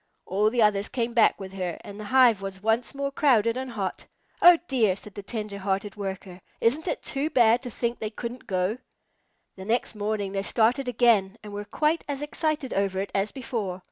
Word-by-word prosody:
All 205 Hz, +3 st, +2 dB
the 235 Hz, 0 st, +2 dB
others 205 Hz, 0 st, +2 dB
came 235 Hz, -2 st, -2 dB
back 230 Hz, -1 st, +4 dB
with 190 Hz, -1 st, -8 dB
her, 180 Hz, -3 st, -3 dB
and 205 Hz, +1 st, -10 dB
the 215 Hz, -, -6 dB
hive 240 Hz, -3 st, +5 dB
was 195 Hz, 0 st, -7 dB
once 225 Hz, +5 st, 0 dB
more 280 Hz, 0 st, -2 dB
crowded 240 Hz, -6 st, +3 dB
and 260 Hz, 0 st, -4 dB
hot. 205 Hz, -5 st, -4 dB, 0.3 s
"Oh 350 Hz, 0 st, +9 dB
dear!" 225 Hz, -8 st, +2 dB
said 205 Hz, +1 st, -11 dB
the 205 Hz, -, -7 dB
tender 210 Hz, -1 st, -5 dB
hearted 195 Hz, +1 st, -2 dB
Worker, 190 Hz, -2 st, -6 dB, 0.2 s
"isn't 290 Hz, +9 st, +1 dB
it -, -, -2 dB
too 285 Hz, +2 st, -2 dB
bad 235 Hz, -3 st, +4 dB
to 250 Hz, -, -6 dB
think 235 Hz, +1 st, -3 dB
they 215 Hz, -, -3 dB
couldn't 235 Hz, +3 st, -7 dB
go?" 190 Hz, +4 st, -1 dB, 0.8 s
The 190 Hz, -, -8 dB
next 235 Hz, +4 st, 0 dB
morning 205 Hz, -2 st, -2 dB
they 195 Hz, 0 st, -1 dB
started 240 Hz, +6 st, +1 dB
again 225 Hz, -4 st, +3 dB
and 210 Hz, -1 st, -9 dB
were 205 Hz, 0 st, -5 dB
quite 305 Hz, +9 st, 0 dB
as 285 Hz, 0 st, -3 dB
excited 300 Hz, -2 st, -2 dB
over 195 Hz, -1 st, 0 dB
it 195 Hz, -, -3 dB
as 195 Hz, +1 st, 0 dB
before. 220 Hz, -8 st, -4 dB
215 Hz, 205 wpm, -26 LUFS, 195-250 Hz, 0.8 s, Oh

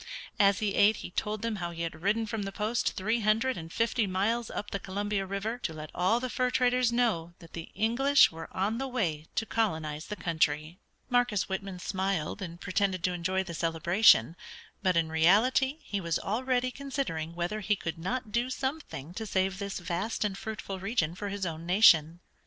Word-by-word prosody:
As 200 Hz, -1 st, +5 dB
he 210 Hz, -2 st, -1 dB
ate 210 Hz, +2 st, +5 dB
he -, -, -8 dB
told 210 Hz, +3 st, -2 dB
them 230 Hz, -2 st, -1 dB
how 175 Hz, -2 st, -3 dB
he 170 Hz, 0 st, -5 dB
had 160 Hz, -1 st, -5 dB
ridden 215 Hz, +4 st, +1 dB
from 220 Hz, 0 st, -3 dB
the 195 Hz, -1 st, -4 dB
post 215 Hz, +4 st, -1 dB
three 220 Hz, +5 st, 0 dB
hundred 225 Hz, +4 st, +2 dB
and 165 Hz, 0 st, -8 dB
fifty 230 Hz, 0 st, +1 dB
miles 215 Hz, +5 st, 0 dB
up 205 Hz, -, -5 dB
the 200 Hz, -, -2 dB
Columbia 200 Hz, +1 st, -2 dB
River 205 Hz, +5 st, -3 dB
to 165 Hz, -, -3 dB
let 155 Hz, -1 st, -8 dB
all 185 Hz, +7 st, +2 dB
the 255 Hz, -, -2 dB
fur 250 Hz, 0 st, 0 dB
traders 250 Hz, -1 st, +2 dB
know 210 Hz, -9 st, 0 dB
that 165 Hz, -3 st, -16 dB
the 165 Hz, -1 st, -7 dB
English 250 Hz, +7 st, +4 dB
were 165 Hz, 0 st, -8 dB
on 210 Hz, +5 st, -1 dB
the 270 Hz, -, -2 dB
way 170 Hz, -, -2 dB
to 225 Hz, -, 0 dB
colonize 160 Hz, -10 st, -1 dB
the 210 Hz, -, -4 dB
country. 160 Hz, -2 st, -1 dB, 0.3 s
Marcus 245 Hz, -6 st, +1 dB
Whitman 190 Hz, -1 st, -4 dB
smiled, 190 Hz, -2 st, -2 dB
and 170 Hz, -2 st, -6 dB
pretended 190 Hz, -2 st, 0 dB
to 180 Hz, -, +1 dB
enjoy 185 Hz, +2 st, -1 dB
the 175 Hz, -2 st, -7 dB
celebration; 165 Hz, -, +4 dB, 0.5 s
but 185 Hz, -2 st, +2 dB
in 165 Hz, -1 st, +2 dB
reality 215 Hz, -, +3 dB
he 200 Hz, -1 st, -3 dB
was 170 Hz, -2 st, 0 dB
already 255 Hz, +3 st, 0 dB
considering 255 Hz, -, -4 dB
whether 175 Hz, +5 st, -2 dB
he 210 Hz, 0 st, +1 dB
could 165 Hz, -4 st, -5 dB
not 215 Hz, +5 st, -3 dB
do 240 Hz, +3 st, 0 dB
something 265 Hz, -, -4 dB
to 220 Hz, +3 st, -5 dB
save 190 Hz, 0 st, 0 dB
this 200 Hz, -1 st, -4 dB
vast 180 Hz, +6 st, -2 dB
and 200 Hz, -2 st, -1 dB
fruitful 200 Hz, -2 st, -6 dB
region 190 Hz, -5 st, 0 dB
for 200 Hz, +3 st, -5 dB
his 200 Hz, -1 st, -3 dB
own 165 Hz, -1 st, -4 dB
nation. 175 Hz, -4 st, +5 dB
195 Hz, 195 wpm, -29 LUFS, 170-225 Hz, 0.5 s, As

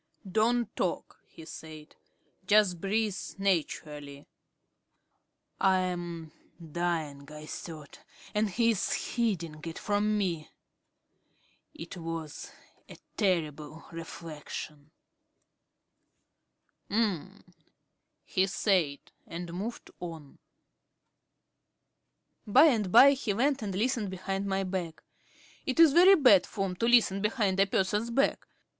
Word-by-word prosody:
"Don't 225 Hz, +5 st, +1 dB
talk," -, -, -3 dB
he 160 Hz, -, -13 dB
said. 155 Hz, -1 st, -11 dB, 0.5 s
"Just 200 Hz, -5 st, +4 dB
breathe 210 Hz, 0 st, 0 dB, 0.2 s
naturally." 150 Hz, -6 st, -2 dB, 1.3 s
"I 190 Hz, -1 st, +4 dB
am 175 Hz, -3 st, -4 dB, 0.3 s
dying," 160 Hz, -4 st, -3 dB
I 150 Hz, 0 st, -9 dB
thought, 155 Hz, -2 st, -9 dB, 0.3 s
"and 210 Hz, 0 st, +1 dB
he 230 Hz, +4 st, +2 dB
is 205 Hz, -4 st, -2 dB
hiding 175 Hz, -10 st, -1 dB
it 165 Hz, -1 st, -6 dB
from 210 Hz, +1 st, 0 dB
me." 170 Hz, -6 st, -2 dB, 1.3 s
It 170 Hz, +3 st, -8 dB
was 165 Hz, -2 st, -6 dB, 0.4 s
a -, -, -11 dB, 0.2 s
terrible 160 Hz, -5 st, -1 dB
reflection. 155 Hz, -2 st, -8 dB, 2.0 s
"Um," 205 Hz, -6 st, -2 dB, 0.7 s
he 190 Hz, +1 st, +1 dB
said, 185 Hz, -7 st, +1 dB, 0.3 s
and 170 Hz, 0 st, -7 dB
moved 210 Hz, +7 st, -6 dB
on. 165 Hz, -5 st, -9 dB, 2.1 s
By 255 Hz, +8 st, +7 dB
and 220 Hz, -, +2 dB
by 280 Hz, +8 st, +9 dB
he 260 Hz, -7 st, -1 dB
went 270 Hz, +4 st, +1 dB
and 200 Hz, -3 st, -4 dB
listened 225 Hz, -1 st, 0 dB
behind 195 Hz, +1 st, -3 dB
my 195 Hz, 0 st, 0 dB
back. 180 Hz, -4 st, -4 dB, 0.6 s
It 260 Hz, +3 st, -1 dB
is 325 Hz, -4 st, +8 dB
very 370 Hz, +4 st, +8 dB
bad 250 Hz, -, +5 dB
form 195 Hz, -3 st, -3 dB
to 230 Hz, -, 0 dB
listen 225 Hz, -5 st, +4 dB
behind 210 Hz, -3 st, 0 dB
a 195 Hz, -, +5 dB
person's 205 Hz, +4 st, 0 dB
back. 270 Hz, +4 st, 0 dB
190 Hz, 105 wpm, -29 LUFS, 165-215 Hz, 2.1 s, by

